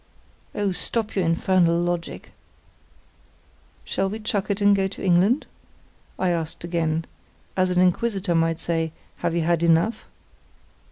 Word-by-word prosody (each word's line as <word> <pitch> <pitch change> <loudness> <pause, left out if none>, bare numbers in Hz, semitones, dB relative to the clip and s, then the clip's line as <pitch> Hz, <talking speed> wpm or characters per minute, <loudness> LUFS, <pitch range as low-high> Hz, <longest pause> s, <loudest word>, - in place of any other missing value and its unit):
"Oh, 205 -2 0
stop 215 +5 -2
your 190 -3 +1
infernal 170 0 +2
logic." 175 -1 -3 1.5
"Shall 195 0 -1
we 215 - -4
chuck 215 -2 -2
it 200 0 0
and 205 0 +5
go 195 -1 +1
to 190 - -9
England?" 190 - +3 0.7
I 185 -1 +1
asked 165 -2 -3
again, 165 -2 -1 0.5
as 185 -1 +2
an 180 0 +1
inquisitor 185 0 +1
might 165 0 +1
say, 165 -1 -1 0.2
"Have 170 - -1
you 170 - +1
had 170 0 +1
enough?" 170 +7 +2
175 Hz, 135 wpm, -24 LUFS, 165-195 Hz, 1.5 s, and